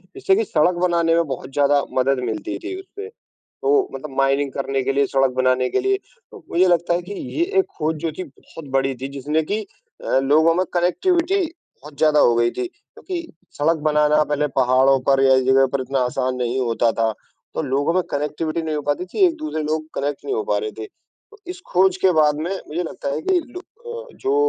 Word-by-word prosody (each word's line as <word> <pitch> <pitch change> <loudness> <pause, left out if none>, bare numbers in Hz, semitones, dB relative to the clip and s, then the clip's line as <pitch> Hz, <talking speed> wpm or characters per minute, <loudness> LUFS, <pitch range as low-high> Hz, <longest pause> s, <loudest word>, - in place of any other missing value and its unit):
जिससे 190 - +2
कि 220 - +1
सड़क 175 0 +2
बनाने 170 -2 +2
में 170 - +3
बहुत 130 -1 -5
ज़्यादा 145 0 +3
मदद 130 +1 +2
मिलती 110 -1 -4
थी 370 +2 -6
उससे। 405 +2 -9 0.3
तो 420 -2 0
मतलब 145 -3 -8
माइनिंग 135 +1 +2
करने 135 0 -2
के 135 +1 0
लिए, 140 0 +2
सड़क 135 -1 +2
बनाने 130 0 +2
के - - +1
लिए, 390 0 +1 0.3
तो 415 -6 -13
मुझे 180 +2 +3
लगता 175 0 +2
है 175 - -1
कि 180 +4 -8
ये 285 +9 -2 0.2
एक - - 0
खोज 160 0 0
जो - - 0
थी 185 - -3
बहुत 160 +1 -13
बड़ी 135 0 +1
थी, 130 +2 -6
जिसने 145 +3 -1
कि 205 +8 -2 0.4
अ, - - +2
लोगों 155 +5 +4
में 185 +2 +1
कनेक्टिविटी 345 - +1 0.4
बहुत 150 0 -12
ज़्यादा 150 -1 +4
हो 120 - +5
गई 120 0 +3
थी। 375 - -3
क्योंकि 350 -1 -8 0.3
सड़क 160 +3 +2
बनाना 150 0 +3
पहले 150 0 0
पहाड़ों 130 +1 +4
पर 135 -1 +4
या 135 0 +6
इस 130 - +1
जगह 135 0 +5
पर 140 - +1
इतना 135 +1 -1
आसान 130 0 -1
नहीं 125 +1 -1
होता 120 -1 +1
था, 115 -1 0 0.4
तो - - -1
लोगों 145 +3 0
में 185 - +3
कनेक्टिविटी 155 +3 -2
नहीं 160 -1 -3
हो 150 - -3
पाती 145 +5 -1
थी, 375 - +3
एक-दूसरे 310 - -3
लोग 155 +1 -2
कनेक्ट 145 +1 -3
नहीं 410 - -2
हो 445 - -1
पा - - +2
रहे 440 - -3
थे। 415 - -5 0.4
तो 430 - -17
इस 365 +1 -8
खोज 185 +1 +3
के 190 - +7
बाद 155 -2 +4
में 165 +4 -3 0.2
मुझे 165 +4 -2
लगता 180 -3 -5
है 150 - -3
कि 370 -2 +2
लू 355 +2 -10
अ, 470 +4 -10
जो 405 +1 -1
155 Hz, 220 wpm, -21 LUFS, 135-190 Hz, 0.4 s, के